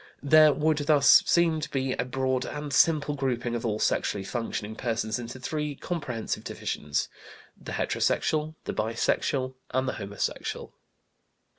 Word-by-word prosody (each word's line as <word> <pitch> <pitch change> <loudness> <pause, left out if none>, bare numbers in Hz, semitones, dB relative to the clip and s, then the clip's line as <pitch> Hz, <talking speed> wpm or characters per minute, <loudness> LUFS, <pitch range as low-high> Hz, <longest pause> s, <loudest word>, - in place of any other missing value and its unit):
There 155 +1 +7
would 150 +1 +1
thus 145 -1 +6
seem 170 -2 +3
to 150 - -4
be 135 -1 -1
a 125 - -2
broad 130 0 -1
and 150 0 -5
simple 150 -1 +3
grouping 125 -4 -2
of 120 - -3
all 105 -2 -1
sexually 100 -2 0
functioning 110 -1 -4
persons 115 -2 -2
into 120 +2 -7
three 150 +2 -3
comprehensive 135 -10 -4
divisions: 75 0 -3 0.5
the - - -9
heterosexual, 155 0 0
the - - -4
bisexual, 130 +4 0 0.2
and 130 +1 0
the - - -1
homosexual. 100 +1 -4
130 Hz, 140 wpm, -27 LUFS, 115-150 Hz, 0.5 s, There